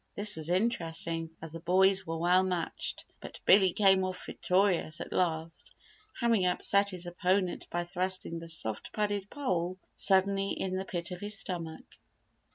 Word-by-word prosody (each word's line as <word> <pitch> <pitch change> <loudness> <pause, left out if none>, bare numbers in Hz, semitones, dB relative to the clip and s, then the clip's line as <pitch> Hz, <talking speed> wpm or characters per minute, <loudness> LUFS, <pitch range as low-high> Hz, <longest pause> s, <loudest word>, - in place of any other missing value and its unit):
This 210 +1 +1
was 160 0 -4
interesting 165 -4 0
as 160 - -7
the 165 - -7
boys 190 +2 +3
were 165 0 -3
well 175 +3 +4
matched, 180 -3 -3
but - - -10
Billy 190 -1 +6
came 190 -1 +4
off 185 0 -4
victorious 180 -4 +1
at - - -6
last, 165 -2 -2 0.5
having 230 -5 +2
upset 200 +2 +3
his 180 -2 -3
opponent 180 +1 0
by 175 0 -1
thrusting 180 -1 -2
the 165 - -9
soft 110 -10 -3
padded 205 -2 -1
pole 185 -10 -2 0.2
suddenly 195 0 +2
in 185 -1 -3
the 190 +1 -3
pit 175 -1 -4
of 180 - -6
his 205 +1 0
stomach. 170 -4 -5
185 Hz, 160 wpm, -30 LUFS, 170-195 Hz, 0.5 s, Billy